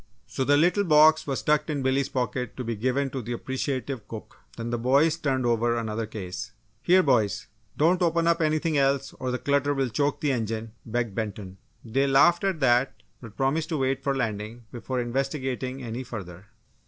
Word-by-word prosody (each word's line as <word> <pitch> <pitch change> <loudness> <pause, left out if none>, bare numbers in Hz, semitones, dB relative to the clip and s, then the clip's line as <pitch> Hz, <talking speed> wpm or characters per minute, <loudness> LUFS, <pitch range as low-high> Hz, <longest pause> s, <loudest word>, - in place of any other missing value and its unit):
So 135 - -3
the 145 +2 +4
little 180 +6 +3
box 155 -2 +5
was 135 -2 -2
tucked 150 +1 +2
in 145 -3 -2
Billy's 130 +1 +1
pocket 125 -2 -3
to 130 - -3
be 115 -1 -3
given 130 +5 -1
to 135 - -4
the 120 +1 -5
appreciative 130 -2 -3
cook. 110 -2 -10 0.2
Then 115 0 -4
the 120 - -1
boys 140 +7 +3
turned 135 -6 -1
over 120 0 +1
another 110 -1 -3
case. 95 -4 -6 0.3
"Here 185 +1 +5
boys! 105 -8 +1 0.3
don't 175 +4 +3
open 170 -1 +2
up 170 0 +2
anything 155 0 +1
else, 135 0 +1
or 130 - -2
the 125 - -1
clutter 140 +1 +1
will 135 -2 0
choke 145 +5 0
the 145 - +1
engine!" 115 -2 -3 0.2
begged 115 -2 -2
Benton. 100 -3 -5 0.3
They 135 +5 +1
laughed 155 +6 +4
at 190 -5 -1
that 125 0 +2 0.2
but 115 -4 -12
promised 140 +4 0
to 160 - -1
wait 135 0 0
for 140 0 0
landing 115 -1 -3
before 125 +1 -4
investigating 130 +1 -3
any 120 +1 -4
further. 100 -6 -9
130 Hz, 190 wpm, -26 LUFS, 115-145 Hz, 0.3 s, box